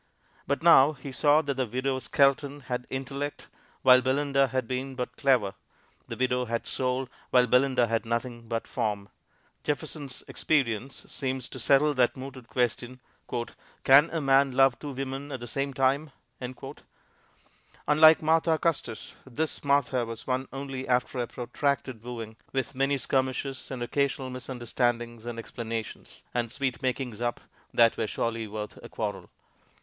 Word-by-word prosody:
But 140 +3 -1
now 155 -3 +7
he 135 -1 -9
saw 145 +4 +4
that 140 -1 -1
the 130 -2 -1
widow 130 +3 -1
Skelton 140 +3 +2
had 125 -1 -4
intellect, 135 +2 -4 0.3
while 130 0 +8
Belinda 140 +1 +2
had 130 -2 -2
been 130 +2 -3
but 125 -1 -4
clever; 125 -9 +2 0.5
the - - -5
widow 125 0 +1
had 115 0 -2
soul, 130 0 -1 0.2
while 125 -1 +5
Belinda 125 0 +3
had 115 0 0
nothing 115 0 -3
but 115 0 -2
form. 105 -4 -2 0.5
Jefferson's 145 -2 -4
experience 135 -3 -1
seems 130 -2 -3
to 130 - -8
settle 145 +5 +4
that 125 -2 +2
mooted 130 -2 -8
question, 125 +1 -1 0.8
"Can 140 +4 +7
a 165 - -2
man 135 -1 +4
love 135 -1 +4
two 150 - -6
women 135 +2 -5
at 130 - -4
the 120 - -7
same 135 +4 -2
time?" 135 +3 +1 1.8
Unlike 155 +2 +7
Martha 160 +1 +3
Custis, 145 -9 -2
this 150 +5 -2
Martha 140 -3 +2
was 115 -1 -7
won 130 0 -1
only 135 -1 -5
after 125 +1 +1
a 120 - -1
protracted 125 0 -2
wooing, 115 -2 -7
with 135 +1 -2
many 135 +1 +1
skirmishes 130 +1 -1
and 125 -2 -4
occasional 135 +1 -1
misunderstandings 120 -2 -2
and 120 -1 -4
explanations, 115 -1 -6
and 120 -2 -1
sweet 130 -1 -2
makings 125 -3 -2
up 120 0 -1 0.3
that 115 -1 +4
were 110 - 0
surely 115 0 -2
worth 105 0 -7
a - - -9
quarrel. - - -4
130 Hz, 150 wpm, -28 LUFS, 120-140 Hz, 1.8 s, while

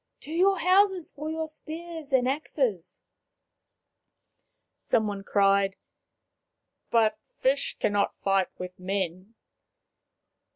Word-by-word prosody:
To 300 - -9
your 380 +4 +3
houses 370 0 +3
for 300 +2 -6
your 320 0 -2
spears 320 0 -8
and 255 -2 +3
axes! 260 - -2 0.9
" - - -55 0.7
Some 225 -2 +2
one 200 -2 -4
cried, 195 -1 +3 0.6
" - - -56 0.2
But 225 -2 +3 0.2
fish 275 +2 +1
cannot 205 -1 +1
fight 195 -1 +2
with 180 0 -8
men." 185 +2 -3
245 Hz, 110 wpm, -27 LUFS, 195-315 Hz, 0.9 s, your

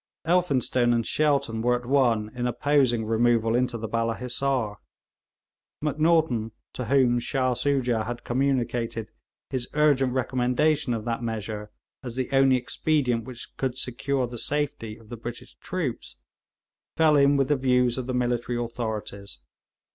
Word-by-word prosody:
Elphinstone 135 -8 +2
and 115 -1 0
Shelton 140 -7 +1
were 125 +1 +3
at 125 0 -5
one 120 -5 +2
in 125 -1 -2
opposing 125 -3 +2
removal 115 0 +2
into 125 0 +1
the 110 0 -4
Balla 115 0 0
Hissar. 125 -4 -1 1.0
Macnaghten, 150 -7 +1 0.2
to 125 - -4
whom 125 -2 +3
Shah 130 +1 0
Soojah 125 -4 0
had 120 0 -5
communicated 120 -4 -1 0.4
his 125 -2 -2
urgent 140 -4 +3
recommendation 130 +1 +1
of 110 -1 -5
that 115 0 -2
measure 110 -2 -4 0.3
as 120 -3 -6
the 130 0 -3
only 135 -1 +5
expedient 125 -2 0
which 125 -2 -9
could 130 -1 -2
secure 130 +1 -1
the 120 -1 -7
safety 140 -7 -2
of 110 -2 -18
the 120 - -7
British 120 +1 -8
troops, 155 - -4 0.8
fell 155 -2 +5
in 140 0 +5
with 135 0 +1
the 145 - +4
views 125 -2 +2
of 130 - -5
the 130 - -2
military 120 -1 0
authorities. 110 - -5
125 Hz, 145 wpm, -26 LUFS, 115-135 Hz, 1.0 s, only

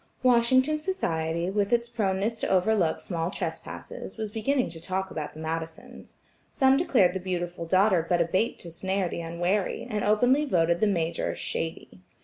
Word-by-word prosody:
Washington 255 +4 +4
society, 170 - -1
with 200 +1 0
its 235 0 +2
proneness 215 -1 -1
to - - -1
overlook 185 -3 +2
small 165 -2 -3
trespasses, 195 - -6
was 215 -2 -4
beginning 250 +5 0
to 165 -1 -10
talk 190 +2 -3
about 150 -1 -5
the - - -9
Madisons. 160 0 -6 0.3
Some 265 -1 +4
declared 255 - +3
the 190 - -2
beautiful 175 -2 -4
daughter 185 -1 +4
but 175 - +3
a 170 - +3
bait 185 +7 0
to 170 - -9
snare 190 +2 -1
theunwary, 175 +4 -1
and 210 -1 -2
openly 245 +7 +3
voted 170 - +2
the 215 - +3
Major 170 -4 -1
"shady." 160 - -5
190 Hz, 160 wpm, -27 LUFS, 170-225 Hz, 0.3 s, Washington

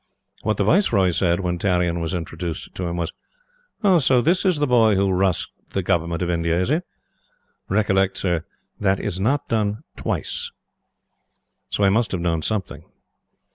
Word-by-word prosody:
What 105 -1 0
the - - +2
Viceroy 105 - +3
said 85 +1 +1
when 90 -1 -2
Tarrion 90 -3 +1
was 85 +2 -2
introduced 85 0 -5
to 90 - -3
him 85 0 -3
was: 85 -2 -3 0.9
"So, 130 -1 +4
this 170 +10 +2
is 185 -4 +3
the 145 - +2
boy 115 -5 +4
who 95 0 +2
'rushed' 95 -2 +1 0.2
the - - 0
Government 85 +1 0
of 90 - -2
India, 85 0 +1
is 90 +8 0
it? 160 +4 +1 0.9
Recollect, 95 -1 +2
Sir, 85 -4 0 0.4
that 95 -1 +2
is 95 -3 -3
not 135 +8 +1
done 105 -2 -1
TWICE." - - -3 1.2
So 100 - -1
he 100 - +5
must 115 +3 +1
have 90 - -1
known 85 -2 0
something. 95 -5 -3
95 Hz, 165 wpm, -22 LUFS, 85-110 Hz, 1.2 s, he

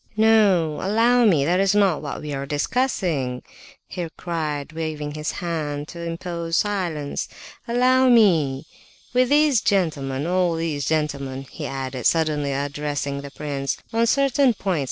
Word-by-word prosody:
"No! 205 -8 +4
Allow 230 +5 +3
me, 160 -10 +4
that 175 +4 +2
is 195 +1 +2
not 195 -6 +3
what 145 -2 -5
we 150 -1 -4
are 140 0 -4
discussing!" 150 - -1 0.4
he 175 -3 -4
cried, 155 -4 -3
waving 155 -2 -4
his 155 +1 -3
hand 150 -4 -3
to 170 - -8
impose 170 0 -3
silence. 175 -8 -2 0.4
"Allow 255 +2 +3
me! 160 - +4 0.5
With 250 0 +3
these 290 -5 +4
gentlemen... 150 -9 0
all 180 -1 +1
these 160 -4 -2
gentlemen," 140 -4 -2
he - - -5
added, 130 -2 -2
suddenly 155 -3 +1
addressing 145 0 -3
the 140 - -8
prince, 140 -2 -3 0.2
"on 230 +1 +2
certain 275 -1 +3
points... 185 -6 -1
165 Hz, 140 wpm, -23 LUFS, 145-205 Hz, 0.5 s, No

